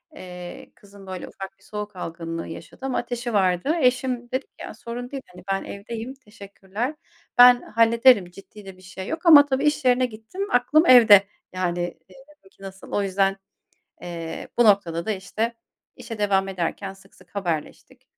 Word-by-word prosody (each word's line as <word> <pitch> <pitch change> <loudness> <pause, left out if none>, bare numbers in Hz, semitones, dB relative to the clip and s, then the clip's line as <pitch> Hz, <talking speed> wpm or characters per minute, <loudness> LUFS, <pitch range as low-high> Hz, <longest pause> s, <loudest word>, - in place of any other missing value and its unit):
eee, 180 -6 -10
kızım, 200 -1 -16
böyle, 185 -1 -6
ufak 195 0 -10
bir - - -26
soğuk 210 -1 -7
algınlığı 165 -1 -6
yaşadı 260 +10 -10
ama 265 - -1
ateşi 240 -1 -4
vardı. 190 - +1
Eşim 250 -1 0
dedi 260 +1 -2
ki: - - -62
"Ya, - - -7
sorun 235 +3 -8
değil, 275 -1 -6
hani, 180 0 -15
ben 195 - -1
evdeyim, 225 +5 -7
teşekkürler. 215 +1 -7 0.4
Ben 245 0 +8
hallederim, 230 -3 +4
ciddi 200 +2 -14
de 190 -1 -11
bir 185 - -18
şey 185 +1 -9
yok." 325 +2 -5
Ama 295 -4 +9
tabii 270 0 -1
iş 295 -3 +1
yerine 250 0 +4
gittim, 245 - -6
aklım 295 +7 +3
evde. 215 -6 +8 0.3
Yani, 175 -1 -1 0.2
dedim 270 -3 -19
ki: - - -20
"Nasıl?" 190 0 -11
O 205 - 0
yüzden, 195 0 +1 0.7
eee, 165 -2 -7
bu 240 - +6
noktada 185 -5 +2
da, 220 - 0
işte, 215 +4 -3 0.4
işe 230 -3 -8
devam 195 -2 +1
ederken 190 +1 -4
sık 195 0 -20
sık - - -22
haberleştik. 170 -6 -5
205 Hz, 170 wpm, -23 LUFS, 190-245 Hz, 0.7 s, Ama